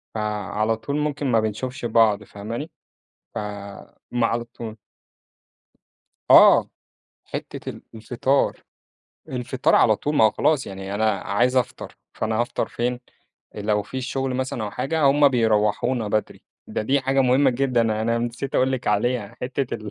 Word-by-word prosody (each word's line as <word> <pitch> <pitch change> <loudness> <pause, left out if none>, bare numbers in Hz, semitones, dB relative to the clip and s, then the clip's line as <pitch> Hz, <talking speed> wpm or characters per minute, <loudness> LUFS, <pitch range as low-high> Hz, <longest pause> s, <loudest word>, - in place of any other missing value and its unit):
فعلى 105 +1 -1
طول 125 +6 -3
ممكن 150 -1 -1
ما 115 - +4
بنشوفش 115 +4 -3
بعض 110 -3 +3
فاهماني؟ 115 +9 -7 0.6
فما 100 -1 -7 0.3
على 115 +1 -1
طول 115 -2 -9 1.5
آه، - - +7 0.6
حتّة - - -7
ال - - -11
الفطار، 125 +5 0 0.7
الفطار 130 -1 0
على 110 -2 +5
طول 150 +7 -2
ما 110 - +6
هو 110 - +6
خلاص 150 +3 +1
يعني 95 0 -6
أنا 110 +1 +2
عايز 120 +6 +1
أفطر، 125 0 -2 0.2
فأنا 110 0 -1
هافطر 120 - -1
فين؟ 120 +1 -2 0.5
آآ، 105 - -6
لو 105 0 +1
في 130 +6 -6
شغل 135 0 -2
مثلًا 130 -3 -2
أو 105 - -4
حاجة 145 +8 -2
هُم 140 +1 +5
بيروّحونا 110 -1 +1
بدري، 105 +1 -2 0.2
ده - - -3
دي 135 +6 +2
حاجة 135 +1 +1
مهمة 130 +1 +4
جدًا، 125 -1 +1 0.2
أنا 115 +1 +1
نسيت 120 +3 -4
أقول 130 +1 +2
لِك 130 -2 -3
عليها. 105 +1 0
حتّة 130 +1 -2
ال 110 -2 -6
120 Hz, 150 wpm, -23 LUFS, 110-130 Hz, 1.5 s, آه